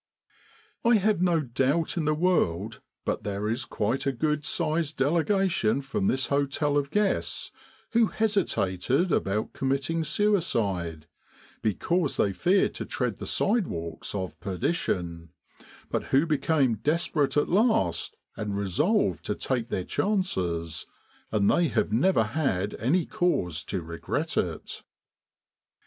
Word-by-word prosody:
I 235 0 +5
have 210 -3 +2
no 175 -3 +3
doubt 135 +5 0
in 165 -3 -1
the 155 0 +2
world 115 - 0 0.2
but - - -1
there 100 +1 -3
is 120 +4 -1
quite 120 +4 -1
a - - +3
good 150 +3 -1
sized 155 -1 -1
delegation 165 - +2
from 135 -8 -1
this 130 +1 +1
hotel 145 +1 0
of 140 -1 +1
guests 205 +4 0 0.4
who 230 -1 +4
hesitated 175 - +1
about 105 -3 0
committing 140 +5 -1
suicide, 115 - 0 0.6
because 145 - 0
they 100 - +2
feared 180 - +2
to - - -5
tread - - -2
the - - -7
sidewalks 95 - -1
of 95 -2 -4
perdition, 90 - -2 0.6
but - - -1
who 140 +4 +3
became 140 -5 +2
desperate 150 +1 +1
at 145 - +3
last 190 - +1 0.2
and 105 -2 -3
resolved 100 - +1
to - - -1
take 120 -3 -2
their 90 - -2
chances, 90 - -1 0.4
and 105 -2 +2
they 170 +8 +4
have 110 -4 0
never 130 - +3
had 105 -6 -1
any 155 - +2
cause 90 - 0
to 95 -3 -3
regret 85 +1 -3
it. - - -2
140 Hz, 130 wpm, -27 LUFS, -, 0.6 s, I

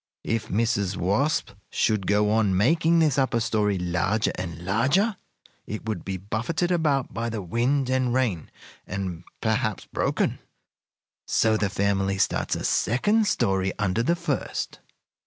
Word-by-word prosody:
If 115 -1 -1
Mrs. 100 -3 0
Wasp 110 - +1 0.2
should 110 -6 0
go 105 +1 +3
on 105 -4 +2
making 160 - +3
this 150 -4 +3
upper 130 -3 +1
story 105 -3 +1
larger 90 +4 0
and 85 -2 -6
larger, 140 - +2 0.5
it 110 +1 -5
would 105 -6 -3
be 95 -1 -3
buffeted 120 - -2
about 150 -6 +1
by 115 +1 -2
the 110 -3 -4
wind 125 +8 +1
and 130 -1 +1
rain, 120 -10 0 0.4
and 90 -3 -4 0.2
perhaps 110 -2 0
broken. - - -1 0.9
So 110 -1 +3
the 105 -2 0
family 100 0 0
starts 95 - 0
a - - -5
second 205 - +2
story 95 - +1
under 105 +2 0
the 170 +9 +2
first. 165 -5 -3
110 Hz, 140 wpm, -25 LUFS, 95-130 Hz, 0.9 s, go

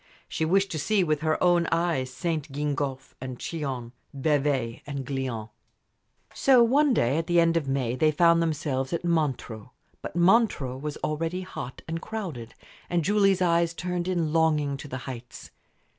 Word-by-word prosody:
She 160 - -2
wished 195 +4 +2
to 155 - -3
see 200 +5 +2
with 155 -3 0
her 155 0 +1
own 175 -1 +4
eyes 165 -6 0
St. 155 +2 -3
Gingolphe 140 -2 -3
and 130 -1 -6
Chillon, 135 -8 -4 0.3
Bevay 135 -5 0
and 140 -2 -4
Glion. 125 -5 -4 0.8
So 255 -3 +5
one 280 +5 +4
day 140 - +2
at 165 - -4
the 175 0 +4
end 165 0 +3
of 160 -4 0
May 130 -3 0
they 155 +4 +3
found 170 +2 +4
themselves 145 -4 -1
at 170 - -2
Montreux. 135 -9 -1 0.3
But - - -7
Montreux 175 - +3
was 150 +2 -5
already 165 +4 -2
hot 135 -8 -7
and 165 +1 -4
crowded, 165 - -6 0.3
and 175 -1 +1
Julie's 195 -2 +3
eyes 170 -1 +2
turned 180 0 -3
in 170 -4 0
longing 155 -3 +2
to 145 - -9
the 130 - -5
heights. 125 -2 -9
155 Hz, 165 wpm, -26 LUFS, 135-175 Hz, 0.8 s, So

